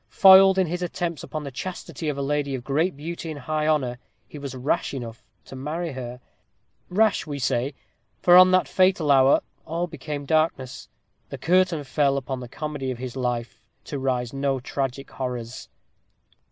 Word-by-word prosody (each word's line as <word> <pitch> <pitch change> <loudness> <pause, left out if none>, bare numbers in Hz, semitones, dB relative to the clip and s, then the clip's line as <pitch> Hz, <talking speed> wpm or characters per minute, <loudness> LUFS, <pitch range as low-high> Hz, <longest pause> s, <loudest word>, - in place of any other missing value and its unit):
Foiled 190 0 +8
in 190 - +3
his 175 +2 -4
attempts 175 -2 -3
upon 155 -1 -6
the 140 - -6
chastity 160 +2 -5
of 145 - -3
a 140 - -2
lady 140 -1 -1
of 125 - -6
great 150 +5 0
beauty 165 +2 -6
and 155 -2 -6
high 155 +3 -1
honor, 130 -6 0 0.3
he 150 - -10
was 140 -2 -6
rash 130 +2 -1
enough 120 -1 -7 0.2
to - - -10
marry 155 +5 -4
her; 125 -2 -7 0.7
rash, 210 -1 +2
we 145 -1 -4
say, 135 +1 -1 0.4
for 175 - +4
from 185 0 +9
that 185 0 +3
fatal 185 -5 +3
hour 135 0 +5 0.2
all 165 +2 -2
became 150 -3 -6
as - - -13
darkness; 155 -5 0 0.4
the - - -6
curtain 175 -3 +2
fell 140 0 +1
upon 130 -1 -4
the 125 -1 -8
comedy 145 -1 -4
of 125 - -3
his 130 0 -6
life, 120 -2 -3 0.2
to 140 - -5
rise 125 -2 -1
to 135 -1 -1
tragic 135 0 -4
horrors. 125 -2 -5
140 Hz, 180 wpm, -24 LUFS, 130-165 Hz, 0.7 s, from